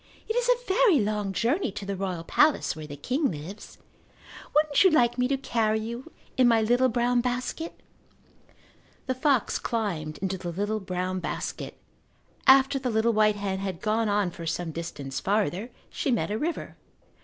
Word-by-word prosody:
"It 445 - -2
is - - +1
a - - +2
very 380 - +4
long 210 -2 -1
journey 245 - 0
to 205 -1 -6
the 200 0 -3
royal 185 -3 -3
palace 295 - +2
where 155 -1 -8
the 145 - -7
king 255 - 0
lives. 165 +6 -8 0.8
Wouldn't 300 +1 +4
you 380 - +7
like 240 -6 +3
me 250 - +3
to 275 +1 0
carry 220 -4 0
you 235 +3 -6 0.3
in 255 -1 +5
my 230 -1 +5
little 245 +3 +3
brown 240 +1 +2
basket?" 250 +7 -3 1.3
The 260 - 0
fox 260 -2 +1
climbed 175 -10 -2
into 190 -1 -3
the 175 - -5
little 205 +5 -1
brown 185 -1 -3
basket. - - -5 0.7
After 270 +1 +6
the 255 -1 -2
little 225 +1 +2
white 215 -1 +4
hen 195 -2 -3
had 190 -3 -4
gone 220 0 0
on 205 -3 +1
for 165 -1 -8
some 165 0 -2
distance 145 -5 -5
farther 200 - 0 0.2
she - - -2
met 235 -4 0
a 215 - 0
river. 330 +4 -3
220 Hz, 175 wpm, -27 LUFS, 190-255 Hz, 1.3 s, you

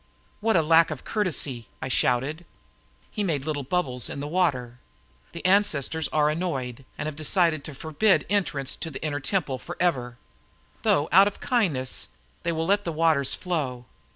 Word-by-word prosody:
"What 225 0 +2
lack 165 0 +5
of 155 -4 -6
courtesy!" 145 - -2
I - - -4
shouted. 135 +5 0 0.7
He 210 - -2
made 150 -8 -1
little 150 -2 -2
bubbles 130 - -1
in - - -6
the 145 - -4
water. 130 -8 0 0.5
"The 170 - -9
ancestors 165 -6 +2
are 150 -1 +2
annoyed 135 -6 -3
and - - -4
have 155 -1 -4
decided 155 0 +2
to 155 - -8
forbid 160 +8 +2
entrance 150 -9 0
to 165 - -4
the 145 - -8
Inner 145 -1 -1
Temple 145 -4 -1
forever; 125 -9 -2 0.6
though, 145 +2 +2
out 195 +3 +7
of 205 - -5
kindness, 165 - 0 0.3
they 170 - -1
will 160 0 -1
let 200 +3 +2
the 170 - -2
waters 155 -4 +2
flow. 140 -9 -3
155 Hz, 160 wpm, -26 LUFS, 135-180 Hz, 0.7 s, out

